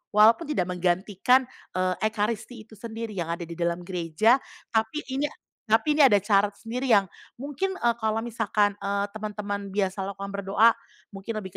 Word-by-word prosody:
walaupun 225 +9 +6
tidak 295 -12 0
menggantikan, 185 +8 +2 0.3
eee, 185 0 +1
ekaristi 220 +2 -3
itu 225 - -30
sendiri 225 0 -6
yang 175 -5 -3
ada 170 +1 -3
di 170 - -7
dalam 170 0 -1
gereja, 180 - +2 0.3
tapi 220 +7 0
ini 280 +3 0 0.4
tapi 230 +7 +2
ini 290 - +8
ada 205 -6 +5
cara 205 0 +2
sendiri 235 +5 -5
yang 195 -2 +4 0.3
mungkin 290 +7 -2
e 240 -10 +1
kalau 220 -1 0
misalkan, 215 -3 0
eee, 200 0 -1
teman-teman 205 -2 -5
biasa 195 -1 -1
lakukan 200 0 -6
berdoa, 200 +3 +3 0.3
mungkin 195 +3 -6
lebih 190 - -7
210 Hz, 160 wpm, -26 LUFS, 195-230 Hz, 0.4 s, ini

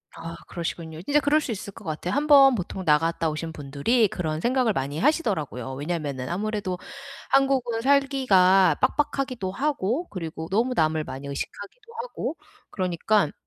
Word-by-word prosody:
아 165 0 -7
그러시군요. 165 -1 -5
진짜 290 +6 +3
그럴 295 +2 +3
수 265 - -4
있을 200 -1 -6
것 - - -13
같아요. 160 +3 -3
1 295 +2 0
번 275 -3 +8
보통 185 -1 -4
나갔다 165 +1 +2
오신 160 +1 -5
분들이 150 - +1
그런 160 -4 -3
생각을 245 -3 +2
많이 140 +3 -3
하시더라구요. 160 - 0
왜냐면은 145 -4 -3
아무래도 200 -1 -2 0.5
한국은 265 -4 +2
살기가 220 - +4
빡빡하기도 255 -6 0
하고 275 - -1
그리고 165 -3 -6
너무 240 +5 +1
남을 155 -3 +1
많이 135 +2 -7
의식하기도 205 - -7
하고 - - -5 0.3
그러니깐 185 -1 +1
190 Hz, 365 characters per minute, -25 LUFS, 160-260 Hz, 0.5 s, 번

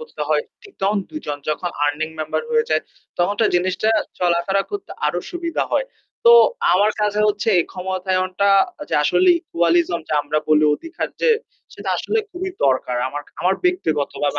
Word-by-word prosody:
করতে 470 - -11
হয়, - - +2 0.2
ঠিক 405 - -16
তখন 200 +1 +2
দুজন 225 - -5
যখন 160 +3 -1 0.2
আর্নিং 145 +2 -1
মেম্বার 155 - -2
হয়ে 460 0 +2
যায় - - +2 0.4
তখন 175 +3 +2
তো - - +4
জিনিসটা 185 +4 +1 0.3
চলাফেরা 180 +3 +1
করতে 410 -1 -6 0.2
আরো - - 0
সুবিধা 340 -2 -2
হয়। - - +1 0.4
তো 470 - +9 0.4
আমার 205 +4 +4
কাছে 210 0 +1
হচ্ছে 210 +1 0
এই 170 - +3
ক্ষমতায়নটা 185 +1 -1 0.4
যে - - -2
আসলে 365 - +3
ইকুয়ালিজম 170 - +1
যে - - -3
আমরা 145 +1 -1
বলি 155 0 +5
অধিকার 330 - -5
যে 480 - +4 0.4
সেটা - - -7
আসলে 445 - -1
খুবই 375 +1 -4
দরকার। 130 -2 +1
আমার 145 +2 -5 0.2
আমার 185 +2 +2
ব্যক্তিগতভাবে 150 - 0
185 Hz, 165 wpm, -20 LUFS, -, 0.4 s, তো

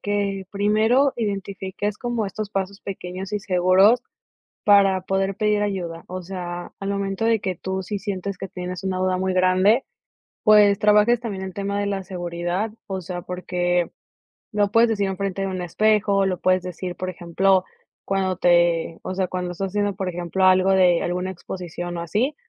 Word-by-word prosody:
que 200 -2 -2
primero 220 +7 +3
identifiques 200 -1 -3
como 240 -3 -2
estos 200 +2 -4
pasos 195 0 -3
pequeños 185 0 -6
y - - +1
seguros 190 +5 +4 0.6
para 200 -2 +5
poder 195 +1 -1
pedir 210 0 +1
ayuda, 180 -5 -3
o 185 +1 -5
sea, 175 -1 -6
al 195 - -3
momento 200 +1 -2
de 225 -1 +3
que 190 -3 -3
tú, 190 +2 -3
si 205 +2 -4
sientes 195 -1 -4
que 195 - -6
tienes 180 +1 -6
una 190 -1 -1
duda 185 0 +1
muy 190 0 -1
grande, 185 +6 +3 0.6
pues, 210 -2 +6
trabajes 210 +3 +4
también 205 -5 -5
el 190 - -6
tema 200 0 -2
de 205 - -1
la 195 -1 -2
seguridad, 175 +2 -3
o 190 -3 -4
sea, 175 0 -6
porque 180 -1 -1 0.6
lo 205 -1 +1
puedes 230 0 +5
decir 205 -3 0
enfrente 195 0 -3
de - - 0
un 185 -1 -3
espejo, 200 +1 +2
lo 185 -2 -2
puedes 185 0 +2
decir, 180 0 -5
por 185 - -4
ejemplo, 185 +2 +1 0.4
cuando 190 -2 0
te 175 -2 +2
o 185 - -4
sea, 185 -1 -1
cuando 180 -1 -3
estás 195 +2 -3
haciendo, 205 +1 -1
por 190 -1 -3
ejemplo, 175 +1 -1
algo 185 0 +5
de 180 -3 +4
alguna 180 +1 -2
exposición 175 -1 -6
o - - -3
así, 215 - 0
190 Hz, 175 wpm, -23 LUFS, 180-205 Hz, 0.6 s, pues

